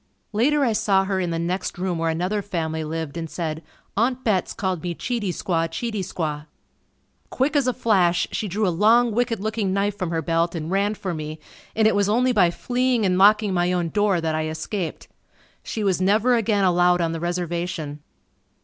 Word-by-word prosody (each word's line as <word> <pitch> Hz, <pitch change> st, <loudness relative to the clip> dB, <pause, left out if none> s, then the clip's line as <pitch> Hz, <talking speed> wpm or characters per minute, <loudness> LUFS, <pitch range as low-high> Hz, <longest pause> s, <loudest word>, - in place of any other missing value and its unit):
Later 280 Hz, +7 st, +3 dB
I 230 Hz, -, +1 dB
saw 195 Hz, -2 st, +2 dB
her 190 Hz, -1 st, -1 dB
in 180 Hz, -2 st, -1 dB
the 165 Hz, -, -2 dB
next 175 Hz, +3 st, -2 dB
room 180 Hz, -2 st, -2 dB
where 165 Hz, 0 st, 0 dB
another 180 Hz, +6 st, -1 dB
family 160 Hz, -5 st, -3 dB
lived 160 Hz, 0 st, -4 dB
and 165 Hz, -1 st, -4 dB
said, 160 Hz, -2 st, -4 dB, 0.3 s
"Aunt 250 Hz, +4 st, 0 dB
Betts 200 Hz, -5 st, +1 dB
called 185 Hz, -4 st, -2 dB
me, 175 Hz, -1 st, -3 dB
Cheatey 230 Hz, -2 st, -2 dB
Squaw, 165 Hz, -2 st, -1 dB
Cheatey 215 Hz, +4 st, -3 dB
Squaw." 155 Hz, -5 st, -4 dB, 0.8 s
Quick 275 Hz, +4 st, 0 dB
as 280 Hz, -3 st, +3 dB
a -, -, +3 dB
flash 190 Hz, -8 st, +2 dB
she 215 Hz, -, -2 dB
drew 205 Hz, +2 st, 0 dB
a 180 Hz, -, +1 dB
long 230 Hz, +5 st, +4 dB
wicked 230 Hz, -1 st, 0 dB
looking 215 Hz, -2 st, -1 dB
knife 200 Hz, +1 st, 0 dB
from 185 Hz, -4 st, -3 dB
her 165 Hz, -1 st, -2 dB
belt 165 Hz, +2 st, 0 dB
and 160 Hz, +1 st, -4 dB
ran 200 Hz, +2 st, +1 dB
for 190 Hz, -3 st, -4 dB
me 155 Hz, -1 st, -5 dB, 0.4 s
and 220 Hz, -1 st, +4 dB
it 220 Hz, -, +3 dB
was 200 Hz, 0 st, +2 dB
only 250 Hz, +4 st, +3 dB
by 195 Hz, -7 st, +4 dB
fleeing 245 Hz, +4 st, 0 dB
and 180 Hz, -1 st, +2 dB
locking 210 Hz, 0 st, +5 dB
my 175 Hz, 0 st, +1 dB
own 175 Hz, -2 st, 0 dB
door 205 Hz, -1 st, +2 dB
that 160 Hz, -1 st, -1 dB
I 155 Hz, 0 st, -1 dB
escaped. 160 Hz, +3 st, -4 dB, 0.5 s
She 220 Hz, -, -4 dB
was 190 Hz, -2 st, +1 dB
never 215 Hz, +6 st, +3 dB
again 220 Hz, -4 st, +2 dB
allowed 180 Hz, -1 st, +4 dB
on 165 Hz, -1 st, 0 dB
the 165 Hz, -, -4 dB
reservation. 170 Hz, -3 st, -3 dB
185 Hz, 200 wpm, -23 LUFS, 170-215 Hz, 0.8 s, locking